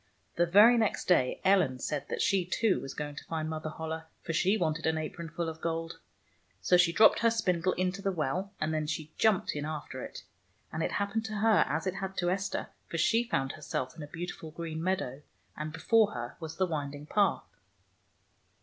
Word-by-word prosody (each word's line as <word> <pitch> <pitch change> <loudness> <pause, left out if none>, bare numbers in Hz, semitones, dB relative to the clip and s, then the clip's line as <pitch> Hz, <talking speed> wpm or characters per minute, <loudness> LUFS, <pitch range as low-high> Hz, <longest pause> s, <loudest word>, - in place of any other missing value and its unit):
The 175 +1 +2
very 215 +7 +7
next 220 -3 0
day 130 -8 +3
Ellen 185 -9 +4
said 145 +3 -3
that - - -1
she, 195 -2 +3
too, 190 +3 +1
was 135 - -7
going 145 -1 -4
to - - -7
find 160 -1 -3
Mother 155 0 -4
Holle, 160 +1 -5 0.2
for 165 - -3
she 195 +5 +3
wanted 160 -3 0
an 160 0 +1
apronful 165 +1 -4
of 160 0 -6
gold. 165 0 -3 0.6
So 180 - +3
she 175 -1 +5
dropped 215 +6 +6
her 230 - +4
spindle 185 -6 +1
into 185 +2 -1
the 195 - 0
well, 180 +4 -2
and 155 +1 -1
then 155 -1 -1
she 155 0 -4
jumped 215 -8 +3
in 145 - -3
after 150 -4 -5
it. - - -8 0.5
And 160 - -2
it - - -1
happened 205 +2 -1
to 215 -1 -4
her 215 +1 +4
as 160 +4 -1
it 185 - 0
had 190 0 -5
to 175 0 +1
Esther, 195 +2 -2 0.2
for - - -3
she 230 0 +3
found 135 - -1
herself 130 +3 -4
in 160 - -9
a 145 - -6
beautiful 165 0 -6
green 160 0 -5
meadow, 160 -8 -1 0.3
and 155 0 -4
before 215 +7 +3
her 120 0 -5
was 160 -2 -7
the 190 - +3
winding 145 -3 -4
path. 200 +5 +1
165 Hz, 205 wpm, -30 LUFS, 155-195 Hz, 0.6 s, very